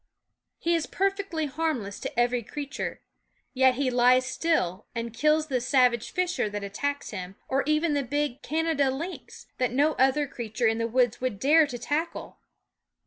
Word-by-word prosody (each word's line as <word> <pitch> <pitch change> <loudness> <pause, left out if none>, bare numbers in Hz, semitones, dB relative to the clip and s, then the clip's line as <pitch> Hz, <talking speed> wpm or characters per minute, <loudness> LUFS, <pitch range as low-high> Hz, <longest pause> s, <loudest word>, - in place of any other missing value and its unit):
He 340 - 0
is 330 -2 0
perfectly 390 -4 -1
harmless 280 -9 -2
to - - -4
every 240 0 +2
creature; 285 +5 -5 0.5
yet 260 -1 +4
he 265 -1 0
lies 250 +1 +4
still 255 - -1
and 230 -1 -4
kills 305 +5 +2
the 260 -5 -1
savage 245 -2 +2
fisher 360 -10 -1
that 205 0 -5
attacks 285 +9 -3
him, 185 -2 -6
or 270 +1 +1
even 305 +1 +2
the 285 - +1
big 290 0 -2
Canada 315 -3 +1
lynx, 325 +8 -6
that 255 -2 +1
no 290 +5 +3
other 270 +3 +3
creature 235 -2 -4
in 225 0 +2
the 230 - 0
woods 245 0 +1
would 255 -5 -1
dare 305 +4 +5
to 250 -3 -5
tackle. 305 +7 -3
265 Hz, 165 wpm, -27 LUFS, 240-305 Hz, 0.5 s, dare